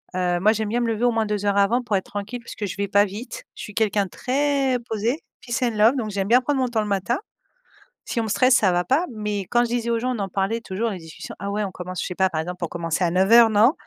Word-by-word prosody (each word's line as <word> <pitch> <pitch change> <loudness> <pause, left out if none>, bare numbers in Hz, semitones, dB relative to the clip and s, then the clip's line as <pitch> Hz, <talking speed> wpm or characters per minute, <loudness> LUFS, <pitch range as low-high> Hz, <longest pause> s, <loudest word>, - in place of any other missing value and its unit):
heu, 180 -1 +1
moi 210 +4 +4
j'aime 220 -1 -2
bien 235 +3 0
me 240 - 0
lever 225 0 -1
au 245 - +4
moins 225 -1 0
2 210 -1 -2
heures 200 0 +2
avant 220 +5 +3
pour 220 -4 -1
être 190 - -1
tranquille 205 +4 -5
parce 235 - -10
que 210 - -3
je 190 - -5
vais 200 0 -1
pas 200 +1 +4
vite 240 - -7
je - - -10
suis 210 - -8
quelqu'un 210 -2 +2
de - - -10
très 275 +1 0
posé 225 +6 -1 0.2
peace 240 -2 -3
and 240 -3 0
love, 220 +5 +5
donc 225 -4 -2
j'aime 195 -1 -2
bien 245 +4 +5
prendre 275 +2 0
mon 255 - +1
temps 235 -2 0
le 210 - -3
matin. 200 +5 0 0.9
Si - - -3
on - - -1
me - - -4
stresse 255 +4 +4
ça 200 -6 +4
va 175 0 +2
pas, 290 - +2
mais 210 -2 -2
quand 240 - +3
je - - -3
disais 235 -1 -1
aux 230 -1 +1
gens 250 +2 -1
on - - -5
en 200 -1 -2
parlait 195 +4 -1
toujours 225 +2 -2
les 195 - -5
discussions 160 -2 -10
ah 200 +2 -4
ouais 210 +1 -1
on 195 - -4
commence 180 0 -6
je - - -3
sais 180 - -5
pas, 190 +1 +2
par 160 -4 -2
exemple 180 +2 -7
on - - -2
commençait 165 +1 -2
à 170 - +2
09:00 210 +6 +6
non: 220 +5 +5
210 Hz, 305 wpm, -23 LUFS, 195-240 Hz, 0.9 s, 09:00